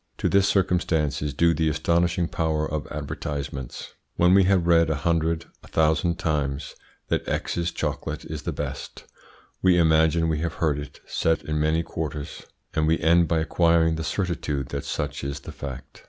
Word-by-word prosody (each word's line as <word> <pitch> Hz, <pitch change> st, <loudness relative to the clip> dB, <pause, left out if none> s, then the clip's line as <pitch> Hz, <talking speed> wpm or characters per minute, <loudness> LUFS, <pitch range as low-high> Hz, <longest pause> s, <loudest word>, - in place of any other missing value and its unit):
To -, -, 0 dB
this 100 Hz, 0 st, +4 dB
circumstance 85 Hz, -7 st, +1 dB
is 75 Hz, -1 st, -1 dB
due 85 Hz, +2 st, +4 dB
the 80 Hz, -1 st, +1 dB
astonishing 85 Hz, +2 st, +1 dB
power 80 Hz, -2 st, -1 dB
of 75 Hz, -1 st, -4 dB
advertisements. 70 Hz, -3 st, -5 dB, 0.2 s
When 90 Hz, +1 st, +4 dB
we 95 Hz, -1 st, +6 dB
have 95 Hz, -2 st, +3 dB
read 85 Hz, -1 st, +4 dB
a 80 Hz, -, +1 dB
hundred, 80 Hz, +2 st, 0 dB, 0.2 s
a -, -, -15 dB
thousand, 80 Hz, +2 st, +2 dB
times 75 Hz, -4 st, -2 dB, 0.3 s
that -, -, -1 dB
X's 85 Hz, 0 st, -1 dB
chocolate -, -, -3 dB
is -, -, -5 dB
the -, -, -3 dB
best, -, -, -6 dB, 0.6 s
we 90 Hz, -1 st, +5 dB
imagine 80 Hz, 0 st, +4 dB
we 80 Hz, -2 st, 0 dB
have 85 Hz, +1 st, -2 dB
heard 75 Hz, -4 st, 0 dB
it 70 Hz, -1 st, -9 dB
said 80 Hz, -2 st, 0 dB
in 75 Hz, +1 st, -2 dB
many 80 Hz, +2 st, +2 dB
quarters, 75 Hz, -3 st, -5 dB, 0.3 s
and 80 Hz, 0 st, +1 dB
we 80 Hz, +1 st, +3 dB
end 85 Hz, +1 st, +4 dB
by 85 Hz, -, +1 dB
acquiring 85 Hz, 0 st, +3 dB
the 80 Hz, 0 st, -3 dB
certitude 80 Hz, -6 st, -2 dB
that -, -, -4 dB
such 70 Hz, -1 st, -3 dB
is 70 Hz, 0 st, -4 dB
the -, -, -8 dB
fact. 65 Hz, -2 st, -8 dB
80 Hz, 175 wpm, -25 LUFS, 75-85 Hz, 0.6 s, we